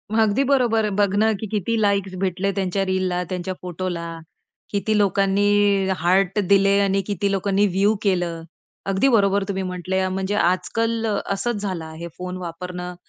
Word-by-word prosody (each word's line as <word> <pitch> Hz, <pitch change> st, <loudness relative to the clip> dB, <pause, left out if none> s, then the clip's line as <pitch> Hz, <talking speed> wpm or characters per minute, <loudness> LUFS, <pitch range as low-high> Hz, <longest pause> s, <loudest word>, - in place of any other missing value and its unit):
अगदी 225 Hz, +4 st, +3 dB
बरोबर. 225 Hz, -5 st, +2 dB
बघणं 205 Hz, +2 st, +3 dB
किती 220 Hz, +1 st, -1 dB
लाइक्स 200 Hz, -2 st, +1 dB
भेटले. 195 Hz, +1 st, 0 dB
त्यांच्या 195 Hz, 0 st, 0 dB
रीलला 185 Hz, -1 st, 0 dB
त्यांच्या 185 Hz, 0 st, -3 dB
फोटोला 170 Hz, -2 st, -5 dB, 0.5 s
किती 210 Hz, +1 st, 0 dB
लोकांनी 200 Hz, 0 st, +2 dB
हार्ट 190 Hz, +4 st, +2 dB
दिले 200 Hz, 0 st, +5 dB
आणि 195 Hz, 0 st, +2 dB
किती 200 Hz, 0 st, -1 dB
लोकांनी 200 Hz, +1 st, +1 dB
व्ह्यू 200 Hz, +4 st, +2 dB
केलं. 175 Hz, -4 st, 0 dB, 0.4 s
अगदी 195 Hz, +7 st, +2 dB
बरोबर 200 Hz, -3 st, +3 dB
तुम्ही 190 Hz, -1 st, -2 dB
म्हंटल 180 Hz, 0 st, -5 dB, 0.2 s
म्हणजे 190 Hz, +2 st, -2 dB
आजकाल 225 Hz, +6 st, 0 dB
अ, 210 Hz, -2 st, 0 dB, 0.2 s
असंच 205 Hz, +1 st, -2 dB
झालं 185 Hz, -5 st, -3 dB
आहे 160 Hz, +2 st, -8 dB
फोन 180 Hz, 0 st, -5 dB
वापरणं 180 Hz, +1 st, -6 dB
195 Hz, 140 wpm, -22 LUFS, 180-205 Hz, 0.5 s, दिले